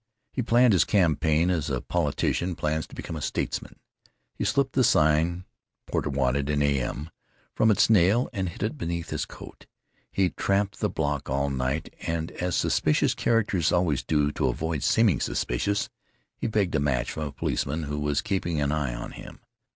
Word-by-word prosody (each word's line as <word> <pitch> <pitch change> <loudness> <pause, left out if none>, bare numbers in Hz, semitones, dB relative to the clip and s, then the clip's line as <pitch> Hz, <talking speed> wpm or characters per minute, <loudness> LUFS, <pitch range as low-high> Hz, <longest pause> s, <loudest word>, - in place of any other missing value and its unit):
He 130 - -1
planned 120 0 +4
his 95 - +5
campaign 80 -2 +2
as 80 -4 -1
a 65 -3 -1
politician 90 +7 -1
plans 80 +1 -1
to - - -13
become 80 - -6
a 75 - -5
statesman. - - -3 0.6
He - - -4
slipped - - +1
the - - +3
sign, 80 +4 +3 0.4
"Porter - - -1
wanted 70 +1 0
in 75 -1 +2
a.m.," 70 +2 -1 0.4
from 110 - +3
its 105 - +4
nail 105 +3 +4
and 95 -4 -2
hid 85 - -7
it 115 +8 -2
beneath 85 -3 -3
his - - -2
coat. - - -12 0.4
He 95 -2 +1
tramped 100 0 0
the - - +1
block 75 -2 -2
all 70 +1 0
night 65 +3 -2
and, 80 0 -2
as 90 -1 -2
suspicious 75 - +2
characters 105 -8 +1
always 85 -6 +2
do 75 -2 +1
to - - 0
avoid 80 -2 -2
seeming 110 - +3
suspicious, 100 +12 -1 0.5
he - - -3
begged 105 -5 0
a 75 - +2
match 65 -3 0
from 75 -1 -3
a - - -6
policeman 70 +3 -2
who 75 0 -3
was 75 -1 0
keeping 95 -6 -1
an 70 0 +1
eye 70 -6 -1
on - - -6
him. - - -11
80 Hz, 180 wpm, -26 LUFS, 70-95 Hz, 0.6 s, his